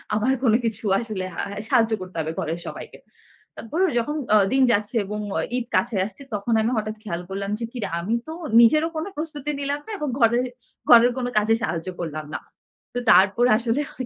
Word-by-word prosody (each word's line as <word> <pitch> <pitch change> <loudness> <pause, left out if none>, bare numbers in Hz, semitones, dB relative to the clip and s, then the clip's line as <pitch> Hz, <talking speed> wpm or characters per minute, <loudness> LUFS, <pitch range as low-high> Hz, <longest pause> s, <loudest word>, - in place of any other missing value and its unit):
আমার 220 +5 +2
কোন 225 -4 +4
কিছু 225 -1 -3
আসলে 215 -5 -4
আ - - -11
হ্যাঁ 200 - -6
সাহায্য 225 -1 +3
করতে 185 -2 -8
হবে 160 0 -2
ঘরের 165 +2 -3
সবাইকে। - - -8 0.6
তারপর 265 +9 -5 0.2
যখন 295 +6 -2 0.2
আ - - +8 0.2
দিন 265 0 +4
যাচ্ছে 210 +2 0
এবং 210 +2 -4 0.2
আ - - +1 0.2
ঈদ 250 - -2
কাছে 235 -3 +1
আসছে, 210 +7 -10
তখন 210 +3 -1
আমি 225 +3 0
হঠাৎ 215 0 -2
খেয়াল 175 -4 -4
করলাম 195 +1 -4
যে, 235 - -2
"কি 255 - -9
রে! - - -1
আমি 210 +7 -2
তো 320 - -5 0.3
নিজেরও 305 +8 +5
কোনো 315 - -3
প্রস্তুতি 300 -2 -4
নিলাম 285 +1 -2
না - - -6
এবং 300 - -2
ঘরের 235 +1 +3 0.4
ঘরের 240 +1 +8
কোন 255 - -1
কাজে 215 +1 +4
সাহায্য 165 +1 -2
করলাম 155 -2 -4
না।" - - -2 0.5
তো 245 - -1
তারপর 200 +6 +5
আসলে 240 +4 0
হয় 255 - -6
225 Hz, 205 wpm, -23 LUFS, 200-255 Hz, 0.6 s, আ